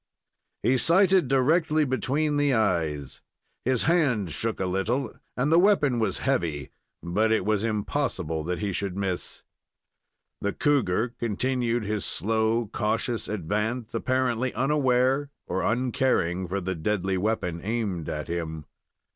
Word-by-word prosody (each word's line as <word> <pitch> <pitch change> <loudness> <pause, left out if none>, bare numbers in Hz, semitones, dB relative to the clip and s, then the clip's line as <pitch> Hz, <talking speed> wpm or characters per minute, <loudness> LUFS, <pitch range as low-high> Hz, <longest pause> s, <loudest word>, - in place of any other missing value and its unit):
He 125 +4 +3
sighted 185 - +4
directly 155 +4 +3
between 145 +4 0
the 145 -3 +2
eyes. 80 - -1 0.4
His 130 -1 +2
hand 135 - +2
shook 110 +11 -3
a 95 - 0
little, 105 +7 -1 0.2
and 135 +5 +1
the 165 - +6
weapon 160 - +3
was 110 -4 0
heavy, 85 - -1 0.3
but 105 +6 +1
it 110 -4 +2
was 105 -1 +1
impossible 100 -7 -1
that 90 +1 -2
he 100 +1 -2
should 95 0 -3
miss. 95 -3 -3 1.0
The 100 - -2
cougar 125 -6 +1
continued 120 0 0
his 105 -1 -2
slow, 110 +2 0
cautious 110 +2 -1
advance, 105 +5 -2
apparently 130 -1 0
unaware 135 +1 +2 0.2
or 95 - -2
uncaring 115 -6 0
for 95 +3 -2
the 95 0 -2
deadly 95 +2 -1
weapon 90 -5 -1
aimed 100 -7 -2
at 75 -1 -4
him. 80 -3 -4
110 Hz, 130 wpm, -26 LUFS, 95-130 Hz, 1.0 s, the